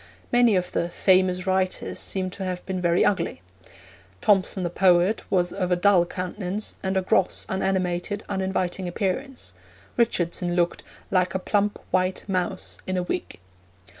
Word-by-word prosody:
Many 240 -3 +5
of 180 -1 0
the 170 - -1
'famous 185 0 +2
writers' 190 -1 -1
seem 185 -1 -1
to 195 - -6
have 180 -1 -4
been 185 -1 -3
very 175 0 +3
ugly. 170 - 0 0.8
Thomson, 195 - +2
the 175 - -2
poet, 180 +3 +3
was 180 -2 +1
of 185 -2 -2
a - - +5
dull 180 -1 +4
countenance, 185 +3 -4
and 190 0 -1
a 190 - +1
gross, 185 - +2
unanimated, 190 +1 -1
uninviting 190 -1 -2
appearance; 210 +9 -3 0.4
Richardson 175 -6 0
looked 175 -1 +1 0.3
'like 185 0 +2
a - - +4
plump 205 +2 0
white 185 0 +1
mouse 185 -1 -2
in 185 0 -1
a 180 - 0
wig.' 90 - -4
185 Hz, 150 wpm, -25 LUFS, 180-195 Hz, 0.8 s, Many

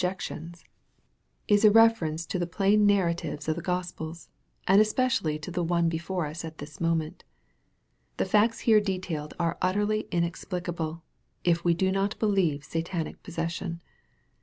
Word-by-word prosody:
89 180 +1 +1
jections, 170 +1 -7 0.8
is 205 0 +4
a 215 - +9
reference 205 -8 +4
to 185 - -3
the 175 - -1
plain 205 +4 +3
narratives 170 -6 0
of 155 - +1
the 170 - -5
Gos 180 0 -2
pels, 160 +1 -8 0.4
and 195 +2 +7
especially 215 -8 +1
to 155 +4 -8
the 175 0 -1
one 170 0 +2
before 170 +1 -2
us 155 +3 -6
at 160 -1 -7
this 145 +1 -10
moment. 165 -2 -1 0.9
The - - +1
facts 215 +4 +2
here 220 -2 +5
detailed 185 -6 -4
are 170 -1 -1
utterly 205 +3 +1
inexplicable, 170 -1 -3 0.4
if 170 -1 +2
we 170 -1 +3
do 190 +2 +1
not 195 +2 0
believe 185 -9 +1
Satanic 165 +2 -4
possession. 170 -1 -4
175 Hz, 155 wpm, -27 LUFS, 165-195 Hz, 0.9 s, a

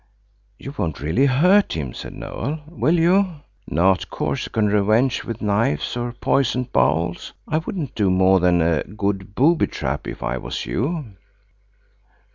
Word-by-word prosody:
"You 135 - -8
won't 80 -6 -2
really 80 - +2
hurt 180 +10 +4
him," 70 -6 -4
said - - -8
Noël, 150 +5 -5
"will 165 +1 +1
you? 180 +2 +3 0.3
Not 95 +4 +2
Corsican 110 -2 -1
revenge 110 +5 +2
with 115 -1 -6
knives, 100 -7 0
or 120 0 -3
poisoned 125 0 0
bowls? 80 +7 0
I 155 - +1
wouldn't 160 -5 -5
do 105 -4 +1
more 95 +1 +4
than 90 -1 +3
a 80 -1 +2
good 100 -1 -3
booby 160 +6 +3
trap, 70 +3 -4
if - - -6
I - - -2
was - - -5
you." 150 - -2
110 Hz, 145 wpm, -21 LUFS, 90-140 Hz, 0.3 s, hurt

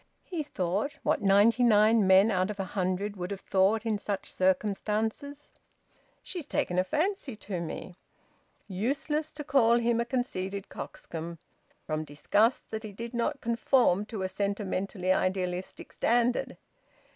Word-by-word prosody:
He 345 -4 -4
thought, 205 - -2
what - - +1
ninety 205 +5 +4
nine 215 -2 +5
men 190 +4 +6
out 185 0 +1
of 205 -1 -5
a - - 0
hundred 190 +2 -2
would 180 0 -4
have 200 -1 -5
thought 200 +4 +2
in 215 -2 0
such 200 -1 -3
circumstances: 215 +9 -1 0.7
"She's 345 -6 -6
taken 180 0 0
a - - +4
fancy 310 - -1
to 205 -3 -5
me!" 170 +2 -6 0.7
Useless 280 +10 -1
to 295 - -6
call 245 -4 +4
him 235 -1 +1
a - - -1
conceited 200 -6 -3
coxcomb, 165 +1 -7 0.5
from 155 0 -2
disgust 205 - +1
that 220 - -3
he 215 -2 -7
did 230 +4 -7
not 260 +4 -1
conform 230 -4 +2
to 215 -5 -4
a - - 0
sentimentally 195 -1 -1
idealistic 185 -1 -2
standard! 240 +1 +1
210 Hz, 145 wpm, -29 LUFS, 190-235 Hz, 0.7 s, men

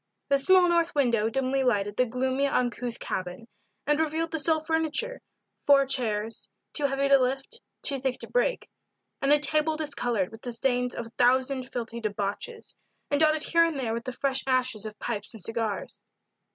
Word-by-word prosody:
A 280 - +6
small 365 +6 +5
north 340 -1 +1
window 235 -6 +2
dimly 270 +2 0
lighted 205 -5 +1
the 250 +2 +2
gloomy, 260 +3 0
uncouth 245 -2 -1
cabin, 185 +4 -5 0.4
and 295 +1 +2
revealed 320 +1 0
the 320 - -1
sole 315 +1 +3
furniture 320 +10 -2 0.5
four 280 -1 +6
chairs, 230 -5 -2 0.2
too 290 -2 +4
heavy 275 0 0
to 275 0 +6
lift, 270 - -2 0.2
too 275 -1 +1
thick 255 -1 -1
to - - -4
break, - - 0 0.5
and 275 - +2
a 295 - +7
table 305 +1 +2
discolored 245 -10 -1
with 225 0 -12
the 245 - -4
stains 250 0 0
of 235 - -4
a - - -11
thousand 255 +1 +2
filthy 235 -1 -4
debauches 215 - -4 0.4
and 285 - +2
dotted 310 0 +3
here 335 0 +4
and 330 -4 0
there 230 -4 -1
with 235 0 -4
the 255 - -3
fresh 270 +1 -1
ashes 255 -5 0
of 215 -1 -10
pipes 210 -1 -4
and 215 - -9
cigars. 225 -1 -3
260 Hz, 180 wpm, -27 LUFS, 235-295 Hz, 0.5 s, a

